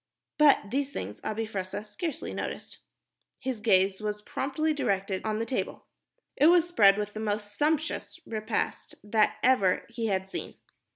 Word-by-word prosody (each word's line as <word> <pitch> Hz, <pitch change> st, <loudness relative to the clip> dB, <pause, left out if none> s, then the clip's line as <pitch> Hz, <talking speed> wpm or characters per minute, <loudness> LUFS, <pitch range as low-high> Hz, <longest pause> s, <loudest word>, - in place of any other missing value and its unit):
But 280 Hz, -9 st, +5 dB
these 275 Hz, +2 st, 0 dB
things 105 Hz, -, -6 dB
Abi 220 Hz, +1 st, -2 dB
Fressah 200 Hz, -1 st, -4 dB
scarcely 275 Hz, +9 st, -4 dB
noted. -, -, -5 dB, 0.6 s
His 260 Hz, -4 st, -3 dB
gaze 195 Hz, -2 st, +3 dB
was 210 Hz, 0 st, -3 dB
promptly 310 Hz, +7 st, -1 dB
directed 195 Hz, -8 st, -1 dB
on 215 Hz, -1 st, -1 dB
the 225 Hz, -, -1 dB
table. 250 Hz, +2 st, -3 dB, 0.5 s
It 290 Hz, -, +5 dB
was 345 Hz, 0 st, +6 dB
spread 205 Hz, -, +5 dB
with 210 Hz, 0 st, -3 dB
the 215 Hz, -, -5 dB
most 210 Hz, -1 st, -2 dB
sumptuous 310 Hz, +4 st, -1 dB
repast 215 Hz, 0 st, -3 dB
that 215 Hz, +1 st, +2 dB
ever 200 Hz, -8 st, +3 dB
he 230 Hz, -1 st, -3 dB
had 190 Hz, -2 st, 0 dB
seen. -, -, -6 dB
215 Hz, 155 wpm, -28 LUFS, 205-265 Hz, 0.6 s, was